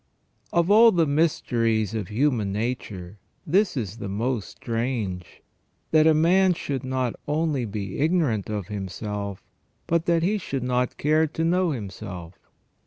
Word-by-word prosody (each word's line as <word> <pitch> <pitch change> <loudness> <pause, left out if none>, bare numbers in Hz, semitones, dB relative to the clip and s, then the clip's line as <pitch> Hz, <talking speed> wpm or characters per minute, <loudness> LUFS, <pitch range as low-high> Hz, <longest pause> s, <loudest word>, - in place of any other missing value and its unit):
OF 170 +2 +2
all 225 +2 +8
the 170 -4 +3
mysteries 115 - +1
of 110 -5 -3
human 115 -3 +1
nature 105 -4 -4 0.3
this 190 +1 +2
is 110 -3 -3
the 100 - -5
most 115 +2 -2
strange, 115 -7 -4 0.5
that 155 0 +6
man 180 +3 +4
should 140 -4 -4
not 130 -2 -1
only 150 -4 0
be 100 -2 -5
ignorant 150 - +1
of 105 -3 -3
himself, 100 0 -5 0.4
but 170 0 0
that 170 -1 +3
he 205 +4 +1
should 135 -8 -4
not 125 0 0
care 155 +2 +3
to 160 +2 -3
know 180 +2 +2
himself. 95 - -6
125 Hz, 140 wpm, -25 LUFS, 105-160 Hz, 0.5 s, all